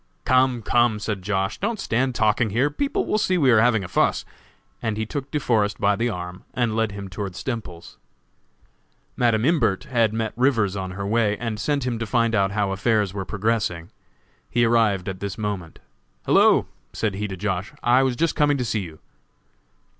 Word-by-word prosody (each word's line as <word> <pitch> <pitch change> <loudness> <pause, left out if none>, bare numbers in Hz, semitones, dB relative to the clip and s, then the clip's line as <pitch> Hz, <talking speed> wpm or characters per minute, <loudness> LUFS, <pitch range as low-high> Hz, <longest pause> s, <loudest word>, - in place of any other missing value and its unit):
"Come, 130 -2 +3
come!" 120 -2 +2
said 105 -1 -3
Josh., 95 +1 -2
"don't 215 +2 -2
stand 130 -4 0
talking 110 +1 +2
here. 125 +8 +1
People 280 - -1
will 215 - 0
see 185 -3 +1
we 135 -6 +4
are 115 - +6
having 115 -4 +3
a - - -5
fuss." - - +1 0.6
And 110 -1 -2
he 110 - -1
took 140 +4 -5
De 150 - -1
Forest 105 -6 +1
by 100 0 +3
the 115 +3 0
arm 90 -2 -6
and 120 -3 0
led 110 -2 0
him 100 -1 -6
toward 95 0 -5
Stemples's. 110 -10 -6 1.2
Madam 115 -2 +2
Imbert 145 - +2
had 115 -4 +1
met 110 0 -2
Rivers 115 -6 +2
on 95 -1 -4
her 100 - -3
way, 105 0 +1
and 115 -2 -4
sent 140 +1 -1
him 120 -3 -2
to 115 - -3
find 115 0 +1
out 100 -3 +2
how 100 -1 -1
affairs 105 0 +1
were 100 -2 -4
progressing. 105 -5 -2 0.6
He 120 -1 +2
arrived 110 -5 +2
at 95 -1 -4
this 100 +2 -5
moment. 100 -6 -4 0.5
"Hello," - - +5 0.3
said 110 -3 -1
he 105 +2 -3
to 95 -2 -6
Josh., 95 +1 -2
"I 120 +2 +4
was 130 -2 +1
just 165 +4 0
coming 145 -2 +3
to 125 - -2
see 110 -2 -1
you." 80 -4 -9
110 Hz, 190 wpm, -23 LUFS, 100-120 Hz, 1.2 s, are